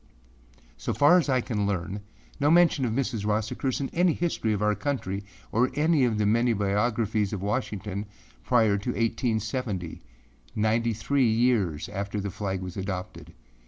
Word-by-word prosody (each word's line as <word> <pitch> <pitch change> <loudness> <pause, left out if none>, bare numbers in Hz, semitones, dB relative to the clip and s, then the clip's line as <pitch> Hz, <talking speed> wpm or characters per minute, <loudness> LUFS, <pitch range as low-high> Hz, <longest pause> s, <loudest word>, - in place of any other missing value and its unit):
So - - -3
far 145 - +6
as 155 - -2
I 130 -2 +3
can 105 -4 -1
learn, 95 0 -2 0.4
no 145 0 +3
mention 165 -5 +4
of 115 - -1
Mrs. 120 -3 -1
Ross 105 +1 0
occurs 130 -2 -2
in 140 - -2
any 175 -1 +2
history 160 -10 -1
of 105 -1 0
our 105 0 +3
country 105 -7 -3 0.3
or 125 +3 +3
in - - -12
any 150 -2 +3
of 115 -3 0
the 105 - +1
many 115 +3 +3
biographies 105 0 0
of 95 -2 -4
Washington, 100 0 -3 0.4
prior 110 - +3
to 105 - -4
1870, 110 - -2 0.5
ninety 115 +2 +1
three 125 +3 +1
years 110 -9 +1
after 100 +1 -4
the 100 0 -3
flag 95 -1 -3
was 90 0 -7
adopted. 95 -1 -6
110 Hz, 165 wpm, -27 LUFS, 100-125 Hz, 0.5 s, far